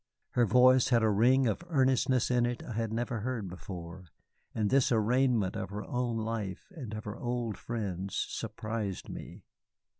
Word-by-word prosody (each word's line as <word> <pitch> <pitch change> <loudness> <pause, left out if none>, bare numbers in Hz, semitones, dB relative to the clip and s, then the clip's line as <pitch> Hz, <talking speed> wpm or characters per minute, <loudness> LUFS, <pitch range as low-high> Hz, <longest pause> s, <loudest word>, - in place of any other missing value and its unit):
Her 120 -2 +3
voice 125 +3 +6
had 120 -3 +4
a 110 - +4
ring 125 +6 +4
of 115 +8 0
earnestness 130 -4 +2
in 120 -1 +3
it 120 0 -4
I 120 - -6
had 115 0 -2
never 120 +1 -2
heard 115 -3 -3
before, 90 0 -8 0.5
and 105 -2 0
this 135 -2 +4
arraignment 120 -2 +2
of - - -4
her 105 +1 -5
own 125 -2 -1
life 110 - -4
and 120 -9 -6
of 110 - -5
her 105 +2 -6
old 120 -3 -2
friends 100 -5 -4
surprised 110 -3 -3
me. - - -8
115 Hz, 170 wpm, -31 LUFS, 105-125 Hz, 0.5 s, voice